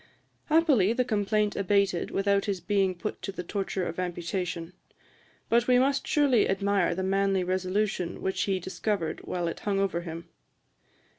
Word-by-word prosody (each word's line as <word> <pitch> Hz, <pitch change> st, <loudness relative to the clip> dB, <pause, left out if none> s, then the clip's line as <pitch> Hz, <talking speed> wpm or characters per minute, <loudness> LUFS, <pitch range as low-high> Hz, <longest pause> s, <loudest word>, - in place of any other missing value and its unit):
Happily 295 Hz, -, +4 dB
the 250 Hz, +1 st, +1 dB
complaint 210 Hz, -1 st, 0 dB
abated 200 Hz, -2 st, +1 dB
without 200 Hz, 0 st, +1 dB
his 200 Hz, -3 st, -1 dB
being 190 Hz, 0 st, +1 dB
put 210 Hz, +5 st, -5 dB
to 195 Hz, -, -4 dB
the 185 Hz, -2 st, -6 dB
torture 190 Hz, 0 st, -2 dB
of 170 Hz, -, -5 dB
amputation. 175 Hz, -1 st, -3 dB, 0.7 s
But 235 Hz, +1 st, +2 dB
we 250 Hz, -1 st, +5 dB
must 275 Hz, +2 st, +1 dB
surely 280 Hz, -6 st, +3 dB
admire 195 Hz, -2 st, +1 dB
the 190 Hz, -, -2 dB
manly 195 Hz, 0 st, +1 dB
resolution 185 Hz, 0 st, -1 dB
which 190 Hz, -, -1 dB
he 195 Hz, -2 st, 0 dB
discovered 185 Hz, -1 st, -2 dB
while 175 Hz, -1 st, -2 dB
it 165 Hz, -, -4 dB
hung 200 Hz, -1 st, -1 dB
over 190 Hz, -3 st, 0 dB
him. 165 Hz, -1 st, -7 dB
195 Hz, 155 wpm, -28 LUFS, 180-210 Hz, 0.7 s, we